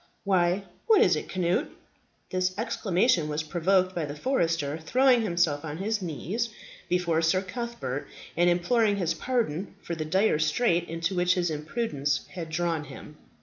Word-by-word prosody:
Why, 185 -1 +2 0.2
what 440 -2 +6
is - - +4
it, - - -5
Cnut?" 180 -1 0 0.6
This 185 0 0
exclamation 195 -5 +1
was 150 +1 -2
provoked 185 +3 +1
by 170 -4 -2
the 145 0 -6
forester 165 - 0
throwing 250 +8 +3
himself 170 -8 +1
on 155 -1 -5
his 210 +3 -1
knees 185 - -3 0.4
before 175 -2 +1
Sir 185 +4 +2
Cuthbert, 190 - -5 0.3
and 175 +1 +4
imploring 205 +5 +2
his 175 -4 0
pardon 200 -5 -2
for 170 - -4
the 160 -2 -3
dire 185 +1 +2
strait 170 +2 +1
into 165 +3 -2
which 180 0 +2
his 175 -2 0
imprudence 150 - -2
had 170 -3 -6
drawn 165 -1 -1
him. 145 +2 -11
175 Hz, 155 wpm, -27 LUFS, 160-200 Hz, 0.6 s, what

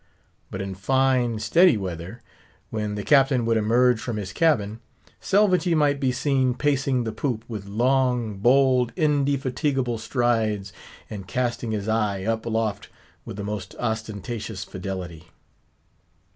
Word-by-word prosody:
But 95 0 -5
in 95 0 -5
fine, 125 +3 +1
steady 140 - +4
weather, 95 +3 -6 0.5
when 105 -1 -3
the 105 - -4
Captain 135 -3 +4
would 115 0 +2
emerge 115 +2 +3
from 120 -3 -4
his 95 -2 -5
cabin, 115 -8 +1 0.4
Selvagee 185 -3 +2
might 145 -2 +2
be 130 -2 +1
seen, 130 -1 +1
pacing 135 -2 +1
the 110 - -3
poop 115 0 -3
with 105 -4 -7
long, 120 -1 +1
bold, 125 +1 +3
indefatigable 140 -5 0
strides, 110 -4 0 0.3
and 100 -4 -8
casting 120 +1 -2
his 105 -2 -3
eye 105 -3 0
up 115 +2 -2
aloft 110 -3 -2 0.4
with - - -8
the 100 - -4
most 100 -3 -5
ostentatious 110 -2 -4
fidelity. 90 -4 -7
115 Hz, 130 wpm, -24 LUFS, 105-130 Hz, 0.5 s, steady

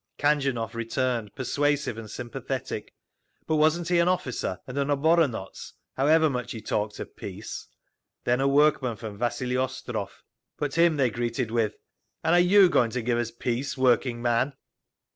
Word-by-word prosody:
Khanjunov 135 -6 +1
returned, 115 -1 -2
persuasive 145 0 0
and 110 -1 -8
sympathetic. 120 +1 -5 0.5
But 160 - +1
wasn't 160 +3 +2
he 175 -1 +3
an 170 - +3
officer, 125 - -1
and 125 - -8
an 140 - 0
oboronotz, 145 - +1 0.2
however 155 +4 +4
much 125 -4 -3
he 115 - -6
talked 105 0 -2
of - - -8
peace? - - -7 0.6
Then 125 +2 +1
a 135 - +3
workman 140 -4 +3
from 105 -1 -8
Vasili 125 +1 -1
Ostrov, 130 0 -4 0.3
but 145 -2 -2
him 165 -2 +4
they 130 -4 +2
greeted 120 0 -2
with, 115 -3 0 0.5
"And 165 - +3
are 175 - +6 0.2
you 200 -2 +9
going 125 -9 +3
to 125 +1 -3
give 120 0 +1
us 120 -1 -1
peace, 125 +3 -3
working 125 -1 +2
man?" 120 +3 +1
130 Hz, 160 wpm, -26 LUFS, 120-145 Hz, 0.6 s, you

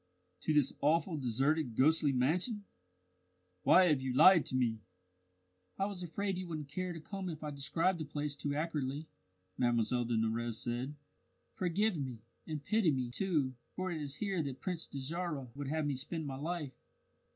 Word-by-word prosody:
"To - - 0
this 145 -3 +3
awful, 165 +4 +2
deserted 135 0 +1
ghostly 150 +2 +4
mansion! 175 - +1 1.0
Why 185 - +7
have 150 -6 +3
you 130 -1 -2
lied 165 +5 +7
to - - -3
me?" 120 -4 +1 1.0
"I 195 - +1
was 200 -3 -4
afraid 185 +2 -2
you 185 - -5
wouldn't 155 -4 -5
care 185 +4 -3
to 165 - -6
come 190 +3 -5
if 155 -2 -6
I 150 - -3
described 165 +6 +1
the 155 - -3
place 145 0 -3
too 145 0 -2
accurately," 150 -2 -2 0.5
Mlle 120 0 +2
de 115 -1 0
Nurrez 115 +1 0
said. 120 +5 -2 0.6
"Forgive 185 +2 +1
me 130 -5 -3 0.3
and 150 -2 -4
pity 215 -5 +3
me, 130 -4 0
too, 150 -4 +1 0.2
for 185 0 -2
it 160 -3 -3
is 140 -1 -2
here 195 -5 -1
that 135 -3 -4
Prince 175 -3 -2
Dajarah 145 -1 -3
would 145 -1 -4
have 155 +2 0
me 145 -2 0
spend 155 +4 -4
my 135 -2 -4
life." 155 -2 -3
150 Hz, 175 wpm, -34 LUFS, 130-175 Hz, 1.0 s, Why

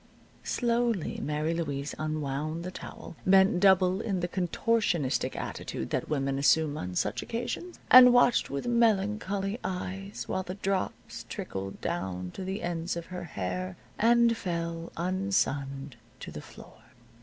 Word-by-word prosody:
Slowly 235 -6 0
Mary 150 +2 -1
Louise 145 -4 -3
unwound 155 +1 -2
the 185 - -5
towel, 175 - -9
bent 190 -1 +5
double 190 0 +4
in 200 -5 -1
the 175 - 0
contortionistic 180 - 0
attitude - - -5
that - - -1
women 135 -2 0
assume 150 +1 +3
on 90 -10 -5
such 105 +6 0
occasions, 245 +10 -4
and 250 0 +11
watched 245 0 +4
with 140 0 -3
melancholy 210 -2 +1
eyes 190 +2 -4
while 190 - -1
the 185 0 -6
drops 195 -1 -3
trickled 95 0 -5
down 90 0 -3
to 190 - -7
the 190 +2 -4
ends 170 0 -2
of 170 - -5
her 180 - -5
hair, 90 - -4 0.2
and 235 +1 +5
fell, 170 -3 -3
unsunned, 145 -8 -1 0.2
to - - -8
the - - -7
floor. - - -14
180 Hz, 140 wpm, -29 LUFS, 145-200 Hz, 0.2 s, and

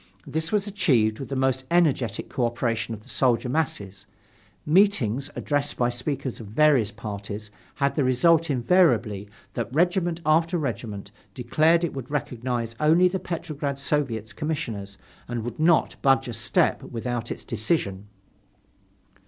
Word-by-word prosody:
This 160 +1 -2
was 205 -2 +1
achieved 130 - +1
with 135 - -6
the 135 - -3
most 130 0 +1
energetic 150 - +1
cooperation 115 -2 -1
of 105 - -14
the - - -21
soldier 125 -1 +1
masses. 100 -10 -2 0.6
Meetings, 150 - +3
addressed 145 -1 -1
by 120 -1 +2
speakers 130 +1 -3
of 110 - -8
various 125 -1 +3
parties, 105 -1 -7 0.2
had 140 -1 +1
the 145 - +1
result, 160 +6 +3
invariably, 120 - +2 0.2
that 120 0 -3
regiment 175 +2 +1
after 165 +3 +3
regiment 110 -8 -4 0.2
declared 155 +7 +3
it 170 - -1
would 130 -2 -7
recognize 120 -4 -2
only 165 +4 +5
the 190 +1 -2
Petrograd 155 -6 -4
Soviet's 130 -7 -2
Commissioners 115 -11 -4 0.3
and 120 -2 -3
would 120 +3 -6
not 160 0 +3
budge 135 -1 +3
a 120 - -4
step 115 +3 +1
without 120 0 -4
its - - -5
decision. 105 - -1
130 Hz, 140 wpm, -25 LUFS, 115-155 Hz, 0.6 s, only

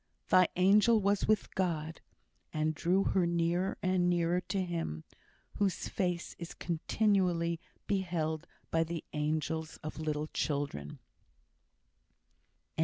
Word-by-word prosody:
thy 185 -1 +6
angel 210 +5 +5
was 200 0 +1
with 215 -1 +1
God, 165 -4 -1 0.5
and 155 0 0
drew 180 +5 +2
her 185 -3 +2
nearer 170 +2 +1
and 185 -1 +2
nearer 175 0 +2
to 195 - -2
Him, 165 - -3 0.5
whose 200 -3 0
face 180 -2 -2
is 170 0 -7
continually 175 -1 +1 0.3
beheld 170 -5 -1 0.2
by 165 0 +3
the 165 -1 -4
angels 155 +1 -1
of 155 +1 -6
little 155 -1 -1
children. 140 - -2
170 Hz, 110 wpm, -32 LUFS, 160-185 Hz, 0.5 s, thy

